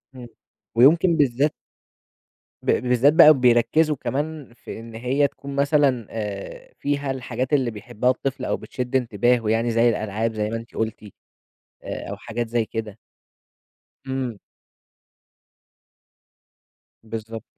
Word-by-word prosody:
إمم. 125 -2 -9 0.5
ويمكن 160 +8 +5
بالذات 140 +1 +2 1.1
ب - - -19
بالذات 125 +3 +3
بقى 155 -1 +9
بيركّزوا 125 +6 +3
كمان 145 -1 -4
في 120 - -9
إن 115 0 -10
هي 130 +5 +1
تكون 140 0 -9
مثلًا 140 -5 +2
آآ 105 -3 -6
فيها 140 -1 -1
الحاجات 130 +1 -4
اللي 130 -5 +2
بيحبها 110 +3 -2
الطفل 130 +1 -2
أو - - -1
بتشد 125 0 -5
انتباهه 120 -2 +1
يعني 115 +1 +1
زي 115 +1 +4
الألعاب 110 +1 -2
زي 105 -1 -2
ما 115 - -3
أنتِ 115 0 -8
قُلتِ، 110 0 -3 0.8
آآ - - -6
أو - - -5
حاجات 120 0 -4
زي 115 0 0
كده. 110 -1 -6 1.1
إمم. 130 -4 -3 2.7
بالضبط. 110 0 -7
120 Hz, 125 wpm, -23 LUFS, 115-140 Hz, 2.7 s, بقى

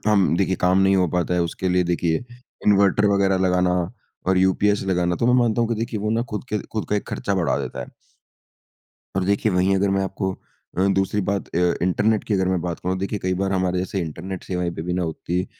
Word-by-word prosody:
हम 100 -5 +3
देखिए, 95 0 +1
काम 90 +2 +3
नहीं 95 0 +4
हो 90 -1 +3
पाता 90 +1 0
है, 90 - +2
उसके 85 +2 -2
लिए 90 0 +3
देखिए 85 +3 0 0.4
इन्वर्टर 100 0 +4
वग़ैरह 100 -1 +2
लगाना 90 0 +2 0.5
और 95 0 +3
यूपीएस 95 +2 +2
लगाना। 90 -1 +1
तो 115 - 0
मैं 125 - +4
मानता 120 -1 +1
हूँ 115 - +1
कि 115 - 0
देखिए 115 -2 -3
वो 105 +1 -1
ना 115 +1 +1
खुद 105 +1 -4
के 105 - -1
खुद 110 - -2
का 105 - +1
एक 105 - -4
खर्चा 100 - -2
बढ़ा 85 -9 +1
देता 70 - -5
है। 60 - -6 1.3
अब 95 - +1
देखिए, 100 +2 +1
वहीं 95 +1 +2
अगर 100 +1 +2
मैं 95 0 +1
आपको 95 0 -2 0.5
अ, 95 - +3
दूसरी 95 +2 +1
बात 100 +1 -2
अ, - - +2 0.2
इंटरनेट 105 +4 +2
की 110 - -2
अगर 95 -2 +1
मैं 95 -1 +1
बात 85 -1 -4
करुँ, 95 +1 -2
देखिए 100 +2 -2
कई 95 0 +1
बार 100 0 0
हमारे 90 -1 0
जैसे 95 +1 -2
इंटरनेट 90 +4 -6
सेवाएँ 90 -2 -2
पे - - -4
भी 90 +2 -3
ना 90 0 0
उत्ती 85 +3 -2
95 Hz, 230 wpm, -22 LUFS, 90-100 Hz, 1.3 s, नहीं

